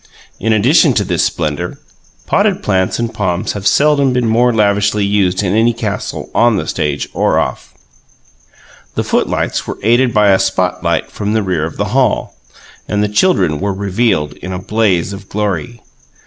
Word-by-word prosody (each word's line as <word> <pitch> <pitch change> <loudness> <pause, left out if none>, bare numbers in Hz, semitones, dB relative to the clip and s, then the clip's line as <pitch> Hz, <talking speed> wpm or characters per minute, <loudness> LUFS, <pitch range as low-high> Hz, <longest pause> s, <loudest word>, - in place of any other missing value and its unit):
In 110 - 0
addition 130 - +4
to 105 - +2
this 90 -4 0
splendour, 75 -2 -2 0.5
potted - - +1
plants 95 -2 0
and 115 -1 -3
palms 95 0 -1
have 100 -1 -3
seldom 140 -3 +3
been 125 -2 0
more 120 +2 +3
lavishly 105 -1 +1
used 100 -1 +1
in 95 -1 0
any 115 +2 +3
castle 105 -3 -4
on 115 -2 +3
the - - -2
stage 75 -1 -2
or - - +1
off. - - -3 1.2
The - - 0
footlights - - -1
were - - -5
aided 120 +3 +3
by 105 -2 +3
a 95 -1 +4
"spot 90 -1 -1
light" 85 -2 -1
from 105 0 -3
the 110 -1 +1
rear 90 -5 -1
of 80 - -7
the - - -1
hall; - - +1 0.5
and 105 0 0
the - - +1
children 100 - +2
were 100 0 -1
revealed 100 -6 0
in 90 - -7
a 90 - -3
blaze 100 -2 0
of 100 0 -10
glory. 105 +3 -3
105 Hz, 175 wpm, -15 LUFS, 95-115 Hz, 1.2 s, addition